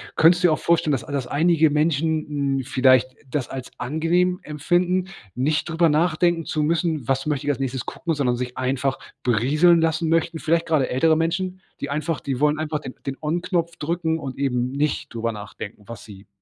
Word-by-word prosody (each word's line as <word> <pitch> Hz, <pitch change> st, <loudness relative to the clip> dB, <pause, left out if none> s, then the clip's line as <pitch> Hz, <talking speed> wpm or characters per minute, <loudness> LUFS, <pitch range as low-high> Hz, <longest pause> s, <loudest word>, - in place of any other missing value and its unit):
könntest 175 Hz, +3 st, +5 dB
du -, -, +7 dB
dir 155 Hz, -, +3 dB
auch -, -, -2 dB
vorstellen, 165 Hz, -2 st, +2 dB
dass 130 Hz, -, -1 dB
a 150 Hz, -, -10 dB
dass 135 Hz, -3 st, -2 dB
einige 160 Hz, +2 st, +3 dB
Menschen, 150 Hz, -2 st, 0 dB
n 130 Hz, -, -3 dB
vielleicht 130 Hz, 0 st, +3 dB, 0.2 s
das 135 Hz, -2 st, -2 dB
als 130 Hz, -2 st, -7 dB
angenehm 175 Hz, +6 st, +1 dB
empfinden, 175 Hz, +5 st, 0 dB, 0.3 s
nicht 150 Hz, +5 st, 0 dB
drüber 165 Hz, 0 st, +2 dB
nachdenken 165 Hz, +1 st, +2 dB
zu 155 Hz, -, -1 dB
müssen: 160 Hz, -3 st, 0 dB
„Was 135 Hz, +1 st, 0 dB
möchte 145 Hz, -1 st, -2 dB
ich -, -, +4 dB
als 135 Hz, -, -4 dB
nächstes 130 Hz, -2 st, -3 dB
gucken“, 170 Hz, -, -3 dB
sondern 135 Hz, -5 st, +1 dB
sich 125 Hz, 0 st, -4 dB
einfach 130 Hz, +1 st, -1 dB, 0.3 s
berieseln 150 Hz, +9 st, +4 dB
lassen 160 Hz, 0 st, +1 dB
möchten? 165 Hz, 0 st, +1 dB
Vielleicht 165 Hz, +1 st, +1 dB
gerade 155 Hz, -5 st, +2 dB
ältere 160 Hz, +5 st, +3 dB
Menschen, 180 Hz, +3 st, -1 dB, 0.2 s
die 140 Hz, -, -3 dB
einfach 155 Hz, +2 st, -2 dB
die 135 Hz, -2 st, -3 dB
wollen 150 Hz, +1 st, +2 dB
einfach 155 Hz, -1 st, -2 dB
den 130 Hz, -4 st, -8 dB
den 135 Hz, 0 st, -4 dB
On-Knopf 170 Hz, +2 st, -1 dB
drücken 160 Hz, +1 st, -1 dB
und 135 Hz, -4 st, -6 dB
eben 125 Hz, -2 st, 0 dB
nicht 145 Hz, +2 st, -2 dB
drüber 115 Hz, 0 st, -2 dB
nachdenken, 105 Hz, 0 st, -9 dB
was 115 Hz, -, -9 dB
sie 100 Hz, -1 st, -13 dB
150 Hz, 195 wpm, -23 LUFS, 135-165 Hz, 0.3 s, du